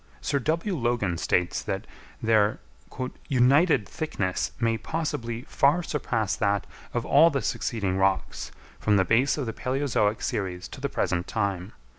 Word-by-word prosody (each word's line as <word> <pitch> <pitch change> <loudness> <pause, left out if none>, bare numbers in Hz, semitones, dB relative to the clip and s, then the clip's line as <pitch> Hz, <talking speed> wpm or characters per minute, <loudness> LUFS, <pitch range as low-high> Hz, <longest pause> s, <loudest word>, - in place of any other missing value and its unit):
Sir 140 - 0
W. 165 - -1
Logan 120 - 0
states 90 -1 +1
that - - -3 0.4
their 110 -2 +3 0.7
"united 135 - +4
thickness 105 - -2
may 115 -1 +2
possibly 120 -5 -3
far 150 +4 +2
surpass 115 - -1
that 100 -2 +1 0.3
of 120 -1 -2
all 155 +4 +6
the 135 -6 -2
succeeding 100 -5 -1
rocks, 95 0 0 0.3
from 105 -1 +3
the 95 - +3
base 125 - +3
of 140 - -2
the 115 - -3
palæozoic 125 -5 0
series 90 -3 -2
to - - -10
the - - -1
present 90 0 -1
time. 100 -2 -2
115 Hz, 145 wpm, -26 LUFS, 100-140 Hz, 0.7 s, all